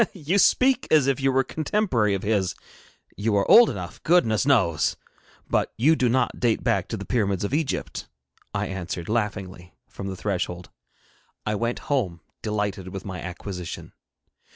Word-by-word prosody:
'You 180 +2 0
speak 260 +5 +4
as 150 -4 +5
if 140 -1 +1
you 135 0 +3
were 135 0 +3
a - - -5
contemporary 145 - 0
of 95 - -5
his. 100 -3 0 0.6
You 105 +1 0
are 100 - +2
old 235 0 +8
enough, 90 -2 -6
goodness 140 - +3
knows! 95 - +2 0.5
but - - 0
you 150 +8 +4
do 125 -5 +1
not 130 +3 0
date 120 -3 +1
back - - +1
to - - -4
the - - -7
Pyramids 100 -6 0
of 100 - -2
Egypt,' 150 -1 -2 0.4
I - - -1
answered, 90 -2 -5
laughingly, 95 -5 -3
from 100 - -7
the 95 - -4
threshold. 90 -3 -3 0.7
I 105 - 0
went 115 +3 -1
home, 100 - -1 0.2
delighted 105 -3 -2
with 95 +1 -7
my 95 -3 -6
acquisition. 90 0 -7
105 Hz, 165 wpm, -25 LUFS, 95-135 Hz, 0.7 s, old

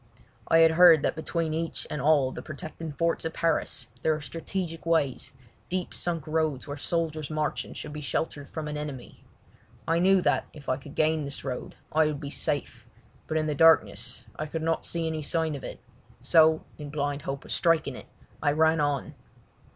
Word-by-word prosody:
I 165 - +5
had 165 0 +7
heard 165 -2 +7
that - - +1
between 160 0 -2
each 165 +1 -3
and 150 - -4
all 145 -2 +4
of - - -9
the - - -6
protecting 155 +2 -7
forts 165 +3 0
of 160 0 -3
Paris 145 -6 0
there 155 +3 +2
are - - -5
strategic 165 +3 -4
ways, 160 -6 0 0.4
deep 185 0 -2
sunk 170 -3 -1
roads 155 -4 0
where 145 - -4
soldiers 155 -1 -2
marching 155 -1 -2
should 150 - -7
be 150 - -5
sheltered 145 -1 -3
from 155 -2 -5
an 150 0 -3
enemy. 145 -4 -7 0.6
I 165 +1 +3
knew 190 +2 +5
that - - +2
if 145 -3 -13
I 130 - +1
could 140 +1 -12
gain 155 0 +2
this 140 0 -7
road 130 -2 -5 0.2
I 155 0 +4
would 150 -2 -2
be 140 -2 -6
safe, 145 -1 -3 0.4
but 155 - 0
in 155 - +1
the 150 - 0
darkness 160 +1 +3
I 155 - -2
could 160 +1 -4
not 165 0 0
see 170 -1 -1
any 160 -1 -2
sign 160 +1 -1
of 140 - -6
it, - - -7 0.4
so, 160 -1 +5 0.2
in 145 -1 -6
blind 145 0 -2
hope 140 +1 -5
of - - -8
striking 165 -2 +2
it, - - -10 0.3
I 145 - +2
ran 160 +1 +4
on. 145 -2 0
155 Hz, 195 wpm, -28 LUFS, 145-165 Hz, 0.6 s, had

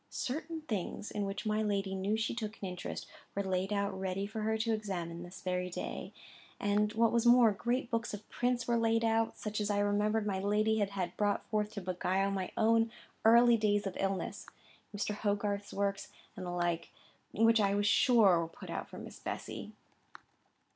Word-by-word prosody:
Certain 315 +5 -4
things, 215 - -4
in 205 -1 -2
which 195 +1 -4
my 215 0 +1
lady 200 -2 0
knew 195 +3 0
she 220 0 -1
took 220 -2 -5
an 195 - -4
interest, 180 -1 -5 0.3
were 200 - 0
laid 190 +1 -1
out 200 -1 0
ready 190 +1 -2
for 215 +2 -5
her 220 +1 +1
to 225 +1 0
examine 185 -6 -3
on 170 - -7
this 180 +2 -11
very 180 0 -1
day; 180 - -5 0.5
and, 205 +1 +2
what 230 0 +3
was 235 0 +2
more, 240 -2 +7
great 240 +5 -1
books 230 0 -1
of 210 0 -8
prints 245 0 -1
were 240 -1 +3
laid 230 0 +2
out, 225 0 +1
such 210 0 -3
as 205 - -1
I 205 - +1
remembered 205 +1 +1
my 195 -2 -1
lady 210 +2 +2
had 200 -1 +1
had 190 -3 -3
brought 205 -1 +1
forth 210 -1 0
to 200 - -4
beguile 185 +2 0
my 190 -2 -2
own 225 +1 +3 0.3
early 235 +1 +7
days 205 -1 +1
of 195 - -3
illness,—Mr. 195 +2 -4
Hogarth's 205 -1 -1
works, 200 0 -1 0.3
and 185 -1 -6
the - - -3
like,—which 175 +6 0
I 200 0 +2
was 205 0 +1
sure 205 -4 +5
were 165 - -1
put - - -10
out - - -4
for - - -10
Miss - - -9
Bessy. - - -5
205 Hz, 190 wpm, -33 LUFS, 195-225 Hz, 0.5 s, more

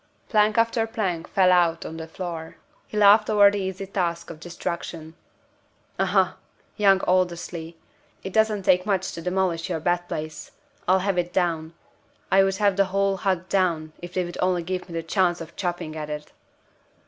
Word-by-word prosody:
Plank 210 0 +3
after 230 0 +2
plank 190 -7 -2
fell 185 -2 +3
out 170 -2 +3
on 160 - -6
the 160 0 -6
floor. 165 -2 -6 0.3
He 215 - -6
laughed 210 +1 +6
over 205 -1 +6
the 205 - -2
easy 190 0 -4
task 170 -3 -2
of 155 - -11
destruction. 170 -1 -6 0.9
"Aha! - - +2 0.4
young 195 -2 +4
Aldersley! 170 -2 -1 0.5
It 190 - -6
doesn't 220 -2 +2
take 185 -2 +4
much 190 -2 0
to 165 - -7
demolish 180 -1 -1
your 165 -3 -1
bed 175 +2 0
place. 155 -1 -6 0.3
I'll 185 +1 +4
have 195 -3 +1
it 175 0 -2
down! 170 -3 -1 0.6
I 195 0 +6
would 195 0 +1
have 200 -1 +2
the 195 - +4
whole 195 +1 0
hut 185 -1 -1
down, 170 -5 0
if 175 +1 -9
they 185 -1 +1
would 175 - -8
only 180 -1 +1
give 180 +1 -4
me 170 - -7
the 165 - -2
chance 175 0 +1
of 165 - -9
chopping 175 -4 -3
at 155 -1 -5
it!" 150 0 -6
180 Hz, 180 wpm, -24 LUFS, 170-195 Hz, 0.9 s, laughed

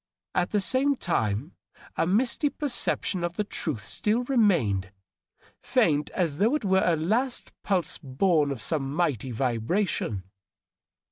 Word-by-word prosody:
At 180 - +1
the 210 - +1
same 265 +8 +3
time 125 - -1 0.4
a - - +1
misty 245 - +2
perception 240 - -1
of 175 0 -2
the 210 - 0
truth 150 - -4
still 220 +4 0
remained, 170 - +2 0.7
faint 145 0 +2
as 165 -6 0
though 225 +8 +3
it 300 - -2
were 190 0 +3
a 170 - +3
last 225 - -1
pulse 185 -5 0
bom 150 +2 +1
of 135 -6 -4
some 145 -3 -1
mighty 145 -8 0
vibration. 120 - -1
175 Hz, 135 wpm, -27 LUFS, 135-210 Hz, 0.7 s, same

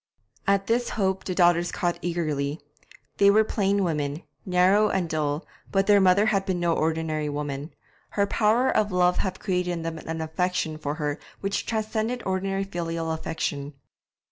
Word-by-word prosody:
At 195 0 +3
this 235 +3 +1
hope 190 -2 0
the 185 - -2
daughters 175 -1 +4
caught 175 -1 -1
eagerly. 155 -4 -2 0.6
They 200 - +6
were 215 +2 +5
plain 200 -2 +1
women, 150 -2 -2 0.2
narrow 190 +4 +4
and 190 -3 0
dull, 155 0 -1 0.3
but 195 0 +2
their 205 -1 +5
mother 190 +2 +5
had 200 -3 +2
been 185 -2 -1
no 170 -1 +2
ordinary 160 -1 -1
woman; 145 +1 -4 0.4
her 200 - +4
power 220 +5 +2
of 210 -1 +2
love 180 0 +3
had 190 - -2
created 180 -2 -1
in 175 -1 -2
them 165 -1 -4
an 160 +1 -5
affection 160 -1 -1
for 145 -1 -3
her 150 -2 -2 0.2
which 195 0 -2
transcended 220 +2 -1
ordinary 195 +1 -1
filial 165 -3 -3
affection. 150 -3 -3
180 Hz, 165 wpm, -26 LUFS, 160-195 Hz, 0.6 s, They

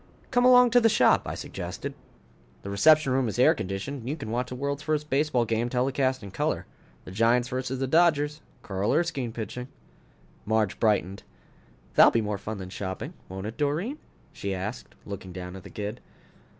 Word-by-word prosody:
"Come 245 -1 +3
along 250 -1 +7
to 245 +1 +6
the 225 - +5
shop," 215 - +4
I - - -3
suggested. - - -6 0.7
"The 100 - -5
reception 155 +5 +5
room 130 -1 +2
is 110 - -4
air 140 +6 +6
conditioned 100 - -4
and 120 +1 -6
you 150 - -1
can 110 -7 -6
watch 125 +2 -1
the 125 - -5
world's 140 +2 -3
first 150 0 -2
baseball 135 -3 +2
game 115 +2 0
telecast 130 0 0
in 100 - -8
color. - - -1 0.4
The - - -9
Giants 115 +4 +2
versus 130 0 -3
the 135 - -1
Dodgers, 150 0 +2 0.2
Carl 95 +1 -1
Erskine 150 -8 0
pitching." 120 +2 -6 0.8
Marge 105 -1 0
brightened. 100 -3 +1 0.7
"That'll - - +8
be 115 - +1
more 105 -2 -2
fun 110 +1 -5
than 95 -1 -8
shopping, 95 -1 -5 0.2
won't 95 +1 -6
it, 110 +2 -6
Doreen?" 165 - -1 0.3
she 100 -1 -3
asked, 100 +6 -6
looking 95 -2 -7
down 90 0 -7
at 95 - -8
the - - -12
kid. 105 +2 -5
125 Hz, 185 wpm, -27 LUFS, 105-145 Hz, 0.8 s, That'll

